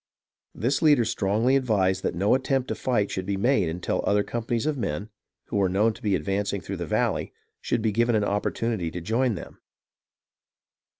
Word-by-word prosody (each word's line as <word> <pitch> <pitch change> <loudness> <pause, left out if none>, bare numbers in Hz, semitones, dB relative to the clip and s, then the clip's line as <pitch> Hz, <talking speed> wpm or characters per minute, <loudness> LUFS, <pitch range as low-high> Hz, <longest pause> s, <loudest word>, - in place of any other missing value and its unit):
This 130 +5 0
leader 145 -7 +5
strongly 110 +3 +1
advised 100 -8 +2
that - - -2
no 100 +4 +2
attempt 130 0 0
to - - 0
fight 105 -6 0
should 95 -1 -4
be 100 -1 -1
made 105 -4 +2
until 85 +2 -2
other 105 0 +2
companies 120 +1 -2
of 155 -1 0
men, 105 - -3 0.4
who - - -1
were 95 -2 +2
known 105 +5 +2
to 115 - -15
be 105 -5 +1
advancing 100 +1 -1
through 95 +3 -6
the 85 -2 -4
valley, - - 0 0.3
should 120 -3 -1
be 110 - +2
given 120 +2 +2
an 105 - +2
opportunity 105 -2 -1
to 90 - -5
join 115 +5 0
him. - - -10
105 Hz, 185 wpm, -26 LUFS, 95-120 Hz, 0.4 s, leader